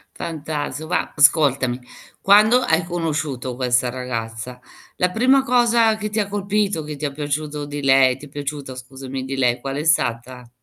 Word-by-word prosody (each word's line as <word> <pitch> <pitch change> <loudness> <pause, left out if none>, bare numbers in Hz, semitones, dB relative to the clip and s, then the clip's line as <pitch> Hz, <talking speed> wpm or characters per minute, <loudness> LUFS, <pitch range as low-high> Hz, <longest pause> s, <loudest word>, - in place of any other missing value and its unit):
Fantastico, 155 -1 -5
va 175 - -1
Ascoltami, 140 -5 +3 0.4
quando 215 +5 +5
hai 165 -7 +1
conosciuto 155 -7 -3
questa 125 -1 +1
ragazza, 125 -1 -5 0.4
la 180 0 +1
prima 260 +6 +3
cosa 235 -3 +3
che 210 0 -4
ti 215 +1 -2
ha 200 - -3
colpito, 205 -3 -1
che 150 0 -6
ti 145 - -11
è 145 - -2
piaciuto 150 +1 -4
di 145 0 -6
lei 135 -1 +5
ti 145 +2 -12
è - - -20
piaciuta, 140 -2 -6
scusami, 130 +1 -7
di 135 +1 -4
lei, 125 -1 +1
qual 135 0 -5
è 145 - -3
stata? 125 -5 -1
145 Hz, 170 wpm, -21 LUFS, 130-180 Hz, 0.4 s, quando